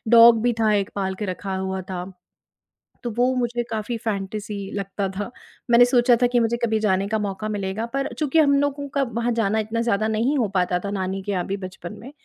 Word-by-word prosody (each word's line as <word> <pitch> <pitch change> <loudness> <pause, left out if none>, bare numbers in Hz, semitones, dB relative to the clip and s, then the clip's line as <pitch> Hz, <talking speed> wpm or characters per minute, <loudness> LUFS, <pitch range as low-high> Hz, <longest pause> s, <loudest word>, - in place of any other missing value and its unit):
Dog 230 -1 +8
भी 245 0 +3
था, 215 -1 +3
एक 200 -1 0
पाल 190 -1 -1
के 210 - -4
रखा 190 +1 -4
हुआ 190 0 -2
था, 180 -1 -3 1.0
तो 240 - -2
वो 250 +2 +3
मुझे 240 -1 -1
काफ़ी 220 +2 -2
फ़ैंटेसी 210 -1 -4 0.2
लगता 195 0 -2
था। 205 +2 -3 0.4
मैंने 240 +1 +8
सोचा 245 0 +4
था 245 - +5
कि 245 0 +2
मुझे 230 +1 +1
कभी 220 -1 +1
जाने 195 0 +2
का 220 0 0
मौका 205 +1 -3
मिलेगा, 205 +2 -2
पर 275 +3 -2
चूँकि 305 +1 +2
हम 285 -2 +5
लोगों 285 0 -1
का 275 - +3
वहाँ 235 -1 -1
जाना 220 -1 +1
इतना 220 +2 -1
ज़्यादा 220 -2 +1
नहीं 255 +7 +1
हो 235 - +2
पाता 180 -1 +2
था, 200 - -5
नानी 190 -1 -2
के 205 - -3
यहाँ 180 -3 -1
भी 195 - -2
बचपन 185 0 -9
में, 260 +5 -10
220 Hz, 220 wpm, -23 LUFS, 195-240 Hz, 1.0 s, Dog